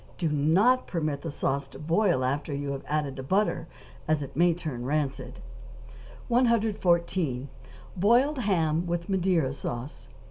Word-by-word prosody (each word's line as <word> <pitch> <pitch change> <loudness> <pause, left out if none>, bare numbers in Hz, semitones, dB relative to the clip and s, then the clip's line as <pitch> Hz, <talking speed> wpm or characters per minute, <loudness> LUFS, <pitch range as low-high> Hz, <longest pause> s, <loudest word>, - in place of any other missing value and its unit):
Do 165 -4 0
not 175 - +3
permit 155 -5 -2
the 165 - -4
sauce 140 -1 -1
to - - -13
boil 165 -3 +1
after 140 +2 -2
you 140 0 -3
have 135 -1 -5
added 150 -2 -1
the - - -4
butter, 175 +2 0 0.4
as 155 -2 +1
it 140 0 -9
may 175 +3 +4
turn 150 -8 -5
rancid. 140 0 -2 0.9
114. 190 - +1 0.5
=Boiled 245 +10 +3
Ham 170 -6 +1
with 170 +2 -3
Madeira 180 -7 +1
Sauce. 125 0 -6
160 Hz, 140 wpm, -27 LUFS, 140-190 Hz, 0.9 s, may